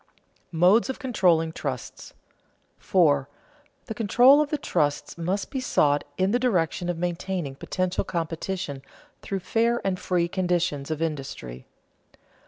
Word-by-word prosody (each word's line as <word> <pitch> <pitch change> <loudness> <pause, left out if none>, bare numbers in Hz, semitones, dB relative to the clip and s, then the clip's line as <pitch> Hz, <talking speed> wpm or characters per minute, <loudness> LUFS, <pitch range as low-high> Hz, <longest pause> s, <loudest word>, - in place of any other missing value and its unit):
[Sidenote: - - -38
Modes 185 +9 +4
of 265 - -3
controlling 180 - +2
trusts] 135 -6 -6 0.6
4. 145 -7 +2 0.6
_The 220 - -6
control 245 +6 +5
of 300 - -1
the 300 - -1
trusts 145 - -1
must 180 +4 -3
be 270 - -2
sought 145 - +2
in 190 +1 +2
the 245 - +2
direction 180 -7 0
of 175 - -2
maintaining 175 -3 -3
potential 185 +6 -2
competition 165 -4 -4 0.4
through 195 -1 -4
fair 235 +4 +1
and 185 -2 0
free 175 -2 0
conditions 175 -6 -1
of 155 0 -2
industry. 135 - -5
180 Hz, 135 wpm, -25 LUFS, 160-200 Hz, 0.6 s, control